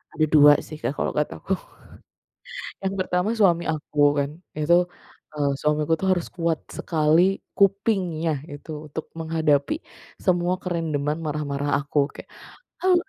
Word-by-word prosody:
Ada 155 - +3
2 145 -1 +9
sih 155 - -8
Kak 145 - -2
kalau - - -1
kata 150 - -1
aku, 195 - -2 1.3
yang 195 0 -1
pertama 185 +3 0
suami 175 -6 +3
aku 155 -1 -4 0.2
kan 140 0 0 0.2
itu, 170 +4 +3 0.5
eee, 145 -1 +1
suamiku 150 +1 +1
itu 190 - -2
harus 185 -3 +2
kuat 165 -2 -1
sekali 165 +4 +2 0.2
kupingnya 190 -5 +2 0.2
itu 145 +2 -9 0.2
untuk 150 +2 -6
menghadapi 160 - +1 0.5
semua 175 -1 +2
kerandoman 155 -4 -1
marah-marah 145 -2 -2
aku 145 +1 -2 0.2
kayak, - - -11 0.5
"Ah 370 -1 +5
160 Hz, 135 wpm, -24 LUFS, 150-180 Hz, 1.3 s, 2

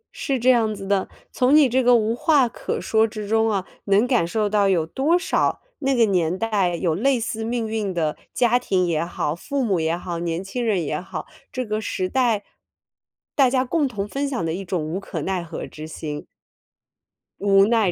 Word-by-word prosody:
是 275 - -1
这 255 +2 +5
样 225 -3 +2
子 195 -1 -8
的， 195 -1 +1 0.2
从 255 +3 +3
你 300 -3 +7
这 255 +2 +2
个 245 0 +6
无 225 0 +1
话 280 0 +3
可 - - -4
说 220 0 +2
之 215 -1 -6
中 225 +1 +2
啊， 195 -3 -1 0.2
能 200 +3 +4
感 245 -8 +2
受 215 +3 0
到 205 -1 +2
有 170 -4 +2
多 280 - +1
少 360 - 0 0.2
那 270 -2 +1
个 235 -2 +5
年 180 -4 +1
代 200 -5 0
有 170 -1 0
类 250 +9 +2
似 225 0 -3
命 230 0 -2
运 215 -3 -2
的 160 -4 -1 0.2
家 245 0 +3
庭 190 -7 +1
也 165 -2 0
好、 170 -3 -2
父 275 - -3
母 195 -6 +1
也 160 +1 0
好、 175 -1 -5
年 170 +1 -2
轻 240 +6 -4
人 205 -7 +1
也 150 +2 -2
好， - - -6 0.3
这 255 -1 -3
个 215 0 -2
时 185 -3 -2
代， 235 -2 +1 0.9
大 270 -3 +5
家 255 0 +1
共 295 +3 +1
同 210 -5 -4
分 275 +5 -2
享 250 -11 -2
的 160 - -1
一 190 +3 -4
种 175 -4 -2
无 165 +5 -3
可 200 - -5
奈 190 -2 -1
何 165 -1 -6
之 155 0 -9
心。 150 -2 -6 1.1
无 195 0 +5
奈 220 -4 +2
210 Hz, 225 characters per minute, -23 LUFS, 180-245 Hz, 1.1 s, 你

